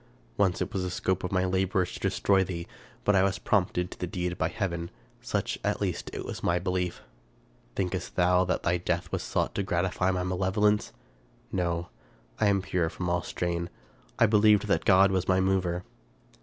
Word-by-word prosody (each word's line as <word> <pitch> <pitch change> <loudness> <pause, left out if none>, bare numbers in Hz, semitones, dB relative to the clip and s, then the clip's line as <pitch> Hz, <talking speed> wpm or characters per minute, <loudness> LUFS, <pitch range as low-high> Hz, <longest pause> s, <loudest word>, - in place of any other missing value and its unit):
Once 95 -3 +2
it - - -8
was 95 - -1
the 90 - -2
scope 95 +1 -1
of 90 - -3
my 95 -1 +2
labors 95 0 0
to - - -7
destroy 95 -1 +2
thee, 85 -2 -5 0.4
but 105 - +3
I 95 - +5
was 100 +1 +1
prompted 90 -4 0
to - - -10
the 90 - -2
deed 90 0 -2
by 80 - 0
heaven; 85 -3 -3 0.3
such, - - -2
at - - 0
least, - - -2 0.2
was - - -6
my 85 - +2
belief. 90 0 -2 0.7
Thinkest 90 -2 -2
thou 90 0 +4
that 90 - -1
thy 85 +1 +2
death 85 -1 -2
was - - -1
sought - - -1
to - - -1
gratify 90 0 0
malevolence? 95 +3 +1 0.6
No. 85 -1 -1 0.5
I - - +3
am 100 -2 +2
pure 90 -3 0
from 90 +1 -4
all 90 0 +1
stain. 85 0 -2 0.5
I 115 - +6
believed 105 -1 +5
that 100 - +2
my - - -18
God 95 0 +6
was 95 -1 0
my 95 0 +3
mover 95 -2 +1
90 Hz, 185 wpm, -28 LUFS, 90-95 Hz, 0.7 s, I